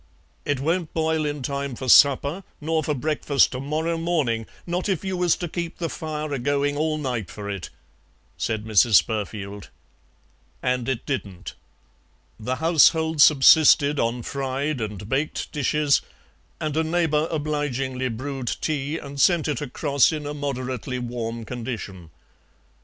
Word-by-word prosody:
"It 145 Hz, -2 st, 0 dB
won't 165 Hz, +3 st, -1 dB
boil 160 Hz, -1 st, +1 dB
in 145 Hz, -2 st, -4 dB
time 140 Hz, 0 st, -3 dB
for 130 Hz, +2 st, -6 dB
supper, 140 Hz, +7 st, +5 dB, 0.2 s
nor 160 Hz, +1 st, -1 dB
for 150 Hz, +1 st, -1 dB
breakfast 145 Hz, 0 st, +2 dB
to 125 Hz, -, -4 dB
morrow 160 Hz, +4 st, -2 dB
morning, 145 Hz, -10 st, 0 dB, 0.2 s
not 180 Hz, +3 st, -2 dB
if 190 Hz, -1 st, -1 dB
you 190 Hz, -1 st, -2 dB
was 180 Hz, -2 st, +2 dB
to 175 Hz, -, -4 dB
keep 170 Hz, +1 st, -5 dB
the 165 Hz, -2 st, -3 dB
fire 155 Hz, -1 st, -4 dB
a 135 Hz, -, -2 dB
going 145 Hz, +2 st, 0 dB
all 155 Hz, +1 st, 0 dB
night 125 Hz, -, -3 dB
for 105 Hz, -1 st, -8 dB
it," 100 Hz, -4 st, -5 dB, 0.7 s
said 110 Hz, -1 st, -2 dB
Mrs. 110 Hz, 0 st, +4 dB
Spurfield. 105 Hz, -2 st, -5 dB, 1.0 s
And 125 Hz, 0 st, 0 dB
it 130 Hz, -2 st, -2 dB
didn't. 100 Hz, -10 st, -5 dB, 0.9 s
The 125 Hz, +4 st, -2 dB
household 160 Hz, 0 st, +3 dB
subsisted 145 Hz, 0 st, +6 dB
on 115 Hz, +1 st, -1 dB
fried 135 Hz, +1 st, -2 dB
and 105 Hz, -2 st, -5 dB
baked 140 Hz, +6 st, -2 dB
dishes, 150 Hz, 0 st, +2 dB, 0.6 s
and 155 Hz, -2 st, -3 dB
a 160 Hz, -, +2 dB
neighbour 160 Hz, -2 st, +1 dB
obligingly 135 Hz, -4 st, -2 dB
brewed 130 Hz, +2 st, -5 dB
tea 150 Hz, +2 st, -2 dB
and 140 Hz, -2 st, -5 dB
sent 175 Hz, -4 st, +4 dB
it 145 Hz, -5 st, -2 dB
across 140 Hz, +1 st, +2 dB
in 155 Hz, -2 st, -4 dB
a 145 Hz, -, -4 dB
moderately 130 Hz, -3 st, -4 dB
warm 115 Hz, -2 st, -4 dB
condition. 110 Hz, -8 st, -6 dB
140 Hz, 145 wpm, -24 LUFS, 125-155 Hz, 1.0 s, subsisted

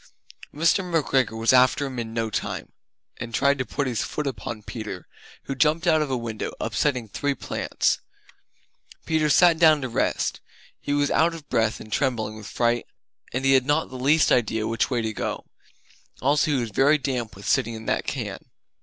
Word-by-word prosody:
Mr. 165 Hz, +5 st, +2 dB
McGregor 135 Hz, -9 st, 0 dB
was 115 Hz, +2 st, +3 dB
after 130 Hz, +2 st, +4 dB
him 130 Hz, -3 st, -5 dB
in 115 Hz, -1 st, -4 dB
no 115 Hz, -1 st, -2 dB
time, -, -, -4 dB, 0.5 s
and 115 Hz, -1 st, -5 dB
tried 140 Hz, 0 st, +2 dB
to 130 Hz, -, -1 dB
put 140 Hz, -, -2 dB
his 125 Hz, -4 st, -1 dB
foot 150 Hz, -, -3 dB
upon 110 Hz, -3 st, -5 dB
Peter, 105 Hz, -6 st, -7 dB, 0.4 s
who 135 Hz, -, -4 dB
Jumped 155 Hz, +5 st, +2 dB
out 160 Hz, -2 st, +4 dB
of 150 Hz, -, -1 dB
a 130 Hz, -, 0 dB
window, 115 Hz, -2 st, -4 dB
upsetting 125 Hz, -6 st, -1 dB
three 140 Hz, +6 st, -2 dB
plants. -, -, -1 dB, 1.1 s
Peter 155 Hz, -1 st, +1 dB
sat 170 Hz, +2 st, +5 dB
down 155 Hz, -3 st, +6 dB
to 130 Hz, -, -3 dB
rest; 115 Hz, -, -1 dB, 0.4 s
he -, -, -5 dB
was 145 Hz, 0 st, +1 dB
out 165 Hz, +1 st, +3 dB
of 155 Hz, -3 st, -11 dB
breath 110 Hz, -1 st, +1 dB
and 110 Hz, -1 st, -9 dB
trembling 115 Hz, -6 st, -1 dB
with 110 Hz, -2 st, -9 dB
fright, 120 Hz, 0 st, 0 dB, 0.4 s
and 130 Hz, +2 st, -2 dB
he 135 Hz, -, +5 dB
had 130 Hz, 0 st, +3 dB
not 150 Hz, +2 st, +1 dB
the -, -, -8 dB
least 145 Hz, +5 st, +3 dB
idea 110 Hz, -2 st, +2 dB
which 115 Hz, 0 st, 0 dB
way 120 Hz, -3 st, 0 dB
to 110 Hz, -1 st, -2 dB
go. -, -, -4 dB, 0.7 s
Also 140 Hz, +3 st, +2 dB
he 145 Hz, -, +2 dB
was 120 Hz, -3 st, -2 dB
very 140 Hz, +8 st, +4 dB
damp 125 Hz, -7 st, -3 dB
with 100 Hz, +1 st, -10 dB
sitting 115 Hz, -4 st, +1 dB
in 110 Hz, 0 st, -9 dB
that -, -, -1 dB
can. -, -, -4 dB
130 Hz, 190 wpm, -24 LUFS, 115-145 Hz, 1.1 s, down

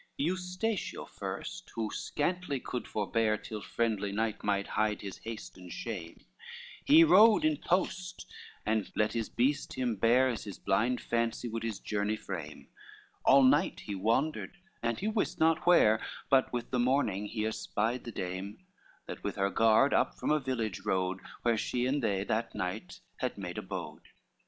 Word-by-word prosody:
LXXX 140 Hz, -, +1 dB
Eustatio 185 Hz, +4 st, -2 dB
first, -, -, -6 dB
who 110 Hz, -2 st, -2 dB
scantly 165 Hz, -2 st, -2 dB
could 125 Hz, 0 st, -5 dB
forbear, 110 Hz, +1 st, +1 dB
Till 105 Hz, 0 st, -7 dB
friendly 105 Hz, -4 st, -1 dB
night 110 Hz, +1 st, -1 dB
might 100 Hz, -1 st, +1 dB
hide 105 Hz, -1 st, 0 dB
his 100 Hz, -2 st, -7 dB
haste 110 Hz, -4 st, -8 dB
and 90 Hz, -1 st, -11 dB
shame, 90 Hz, -8 st, -6 dB, 0.6 s
He 310 Hz, +4 st, +8 dB
rode 225 Hz, -, +7 dB
in 310 Hz, -1 st, +2 dB
post, 185 Hz, -1 st, -1 dB, 0.4 s
and 110 Hz, -1 st, 0 dB
let 105 Hz, 0 st, +1 dB
his 115 Hz, -2 st, -2 dB
breast 135 Hz, +4 st, 0 dB
him 125 Hz, -3 st, -1 dB
bear 120 Hz, +6 st, +4 dB
As 120 Hz, -4 st, -3 dB
his 100 Hz, -3 st, -7 dB
blind 115 Hz, +6 st, +1 dB
fancy 115 Hz, 0 st, -1 dB
would 115 Hz, 0 st, -4 dB
his 115 Hz, -3 st, -3 dB
journey 105 Hz, 0 st, -1 dB
frame, 85 Hz, -8 st, -7 dB, 0.6 s
All 135 Hz, 0 st, +7 dB
night 145 Hz, +7 st, +3 dB
he 105 Hz, -, -5 dB
wandered 115 Hz, -, 0 dB, 0.2 s
and 115 Hz, -1 st, 0 dB
he 210 Hz, -, -2 dB
wist 215 Hz, -1 st, -1 dB
not 160 Hz, 0 st, +3 dB
where; 110 Hz, -11 st, +5 dB, 0.3 s
But 135 Hz, -1 st, +4 dB
with 120 Hz, -1 st, -4 dB
the 125 Hz, -, +1 dB
morning 120 Hz, -6 st, +1 dB
he 110 Hz, 0 st, -2 dB
espied 110 Hz, +2 st, -1 dB
the 120 Hz, -, -6 dB
dame, 95 Hz, +1 st, -5 dB, 0.5 s
That -, -, -8 dB
with -, -, -2 dB
her 100 Hz, 0 st, +1 dB
guard 115 Hz, +5 st, +4 dB
up -, -, +2 dB
from -, -, -1 dB
a 155 Hz, -, +4 dB
village 120 Hz, -7 st, -2 dB
rode 95 Hz, 0 st, 0 dB, 0.2 s
Where 115 Hz, -2 st, +2 dB
she 125 Hz, +3 st, -1 dB
and 140 Hz, +3 st, +1 dB
they 100 Hz, -4 st, 0 dB
that 110 Hz, +3 st, -2 dB
night 90 Hz, 0 st, -4 dB, 0.2 s
had -, -, -2 dB
made -, -, -5 dB
abode. -, -, -6 dB
115 Hz, 170 wpm, -31 LUFS, 105-140 Hz, 0.6 s, He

